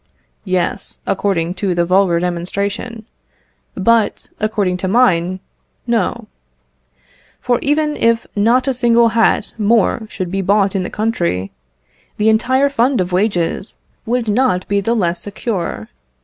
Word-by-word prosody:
Yes, 185 -2 -2
according 180 -4 0
to 190 -4 0
the 170 0 +1
vulgar 185 -1 +3
demonstration; 200 +6 -3 0.7
but, 225 +3 +1
according 205 -4 0
to 185 - -3
mine, 185 -5 +2 0.4
No; 235 0 -1 1.1
for 245 -1 0
even 300 +1 +1
if 230 0 +1
not 235 +6 +2
a 270 - +2
single 235 -1 +3
hat 230 0 +1
more 220 +1 +2
should 185 -3 -5
be 195 0 -1
bought 200 +1 +2
in 195 - +1
the 180 - -4
country, 175 - -1 0.7
the 215 +1 +3
entire 255 +5 +3
fund 260 -1 +1
of 180 0 -1
wages 185 -1 -1 0.3
would 240 0 0
not 210 -4 +1
be 200 0 +1
the 230 +4 0
less 175 -5 0
secure. 195 - -4
205 Hz, 135 wpm, -17 LUFS, 185-230 Hz, 1.1 s, vulgar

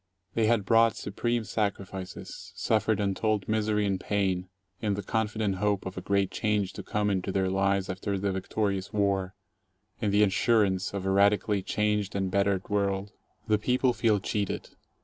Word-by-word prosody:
They 115 -1 +2
had 110 -3 +2
brought 115 +1 +4
supreme 120 -1 -2
sacrifices, 95 -2 -4
suffered 110 0 +1
untold 105 +1 0
misery 105 -1 +1
and 95 -2 0
pain, 95 -3 -1 0.3
in 105 -2 0
the 100 - -4
confident 110 -2 -1
hope 105 0 0
of 95 - -5
a 95 - -5
great 100 0 +1
change 105 -3 0
to - - -6
come 105 -1 -1
into 95 0 -1
their 95 -1 0
lives 95 0 +1
after 95 +1 -2
the 100 +1 -1
victorious 95 0 -2
war, 100 -2 0 0.7
in 105 - +1
the 105 +1 +4
assurance 100 -1 +2
of 95 -1 -3
a 95 - +1
radically 100 +1 +3
changed 105 0 0
and 95 -1 -1
bettered 100 -1 +1
world. 100 0 -1 0.4
The 105 -1 +3
people 125 +2 +2
feel 110 -4 +2
cheated. 100 0 -2
100 Hz, 165 wpm, -28 LUFS, 95-105 Hz, 0.7 s, brought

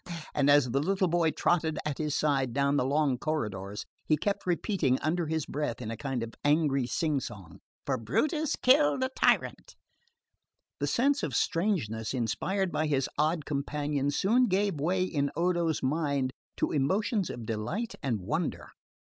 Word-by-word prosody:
And 145 -1 +2
as 145 -4 +5
the 135 - +2
little 190 +3 +1
boy 170 -1 +2
trotted 160 -1 +1
at 150 -2 -3
his 150 -2 -1
side 135 -5 +1
down 140 +1 +2
the 125 - +2
long 140 -2 +1
corridors 105 -10 -3 0.2
he 155 - +2
kept 200 +1 -2
repeating 175 - +1
under 165 +1 -1
his 160 -1 -1
breath 145 -5 -3
in 115 -3 -5
a - - -3
kind 130 -1 -3
of 115 - -7
angry 145 -4 +2
sing 155 0 0
song, 100 -9 -9 0.3
"For - - 0
Brutus 300 - 0
killed 270 0 +4
a 260 - 0
tyrant." 265 - +1 1.0
The - - 0
sense 280 +4 +2
of 145 -7 -3
strangeness 135 - 0
inspired 180 - -1
by 155 - 0
his 135 -3 +1
odd 155 0 +1
companion 145 0 -1
soon 230 - +3
gave 195 -4 0
way 180 +4 +1
in 145 -6 0
Odo's 170 -3 0
mind 140 -2 0 0.3
to - - 0
emotions 190 - +1
of 120 - -6
delight 115 - -3
and 120 -8 -1
wonder. 90 - -3
150 Hz, 165 wpm, -29 LUFS, 130-180 Hz, 1.0 s, as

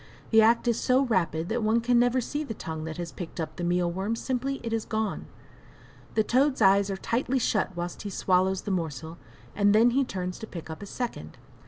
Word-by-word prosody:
The 220 -1 +7
act 230 +2 +4
is 235 -1 +2
so 260 +2 +3
rapid 170 - 0
that 235 +2 0
one 220 +2 +3
can 240 +1 +3
never 245 +1 +3
see 295 +5 -3
the 225 -7 -6
tongue 160 -4 -5
that 160 0 -6
has 175 -1 -5
picked 175 -1 -8
up 155 -1 -4
the 175 - -4
meal 175 0 +1
worm 195 +6 -2
simply 265 +3 -2
it 230 -1 -3
is 225 -1 0
gone! 220 -1 -3 0.9
The 220 - +4
toad's 260 +5 +2
eyes 200 -1 +5
are 195 - -2
tightly 250 +6 -1
shut 210 -6 0
whilst 175 0 -4
he 205 - -5
swallows 190 0 +1
the 205 - -3
morsel, 160 -2 -4 0.4
and 205 0 +4
then 235 +3 +6
he 275 +3 +2
turns 180 -7 -4
to 220 - -7
pick 165 -4 -8
up 160 - -8
a 205 - -7
second. 210 - -5
210 Hz, 220 wpm, -27 LUFS, 175-235 Hz, 0.9 s, The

